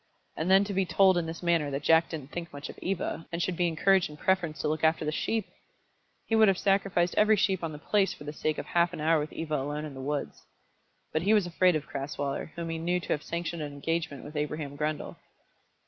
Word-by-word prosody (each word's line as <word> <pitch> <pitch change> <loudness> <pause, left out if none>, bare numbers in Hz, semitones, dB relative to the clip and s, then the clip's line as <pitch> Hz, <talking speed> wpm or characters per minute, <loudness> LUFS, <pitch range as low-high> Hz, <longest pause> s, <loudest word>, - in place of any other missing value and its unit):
And 160 +3 -2
then 190 +1 +6
to 200 0 -4
be 195 0 +2
told 190 +1 +4
in 170 -2 0
this 165 +2 -7
manner 170 -4 +2
that 140 +1 -3
Jack 160 +2 +4
didn't 150 -4 -7
think 175 0 -5
much 145 0 -7
of - - -10
Eva, 180 -3 -3
and 170 - -3
should 175 +1 -1
be 175 +1 +2
encouraged 180 +3 +3
in 150 - -11
preference 175 -3 0
to - - -1
look 155 +1 -1
after 160 0 +3
the 150 - 0
sheep! 220 +6 -1 0.8
He 225 - +1
would 220 -1 +6
have 195 -2 +3
sacrificed 195 -3 +2
every 215 +1 +5
sheep 190 -3 +1
on 165 - -2
the 150 - -7
place 195 +5 +1
for - - -9
the 150 0 -6
sake 155 0 -1
of - - -4
half 170 0 +2
an - - -6
hour 160 +1 +3
with 150 +1 -4
Eva 155 -2 -2
alone 145 +3 -3
in 150 - -7
the 135 - -8
woods. 145 +1 -3 0.7
But 155 - +1
he 205 +5 +4
was 205 -4 +3
afraid 175 0 +3
of 150 -1 -2
Crasweller, 140 +1 -4
whom 170 -1 -4
he 165 - -3
knew 175 +2 0
to - - -10
have 150 - -3
sanctioned 170 0 -4
an 145 -1 -5
engagement 150 0 -3
with 150 +2 -10
Abraham 150 -1 -3
Grundle. 150 +1 -3
165 Hz, 245 wpm, -29 LUFS, 150-180 Hz, 0.8 s, then